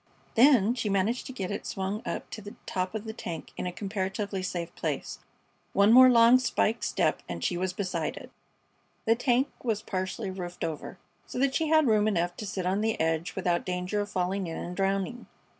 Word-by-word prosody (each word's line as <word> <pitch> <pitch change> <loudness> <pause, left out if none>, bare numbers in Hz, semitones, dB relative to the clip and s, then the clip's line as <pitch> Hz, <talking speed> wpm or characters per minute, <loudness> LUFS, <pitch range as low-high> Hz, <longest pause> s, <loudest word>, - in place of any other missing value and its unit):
Then 240 -3 +6
she 230 -4 -2
managed 200 +5 0
to - - -6
get 195 -8 -4
it - - -4
swung 195 +3 -3
up - - -3
to 220 - -6
the 205 0 -10
top 185 +2 -2
of 215 - -3
the 220 -1 -6
tank 165 -7 -6
in - - -3
a - - -2
comparatively 195 +1 -3
safe 175 -2 -4
place. - - -3 0.5
One 200 +3 +5
more 255 +1 +9
long 235 +1 +7
spike 230 -2 +1
step - - +1
and 85 -1 -5
she - - 0
was 185 +1 -1
beside 185 0 -3
it. - - -10 0.7
The 225 - +5
tank 245 +3 +2
was 220 -4 -1
partly 190 +2 -3
roofed 180 -2 -6
over, 160 -2 -4 0.3
so - - -7
that 270 +1 +2
she 320 +3 +1
had 315 -1 +5
room 215 -3 +3
enough 175 -4 0
to 210 - -5
sit 190 -2 -3
on 190 +3 +1
the 225 0 0
edge 165 +1 0
without 175 -1 0
danger 180 +3 -2
of 205 - -4
falling 185 0 -1
in 165 - -5
and 180 - -5
drowning. 195 +5 -1
200 Hz, 205 wpm, -28 LUFS, 180-225 Hz, 0.7 s, more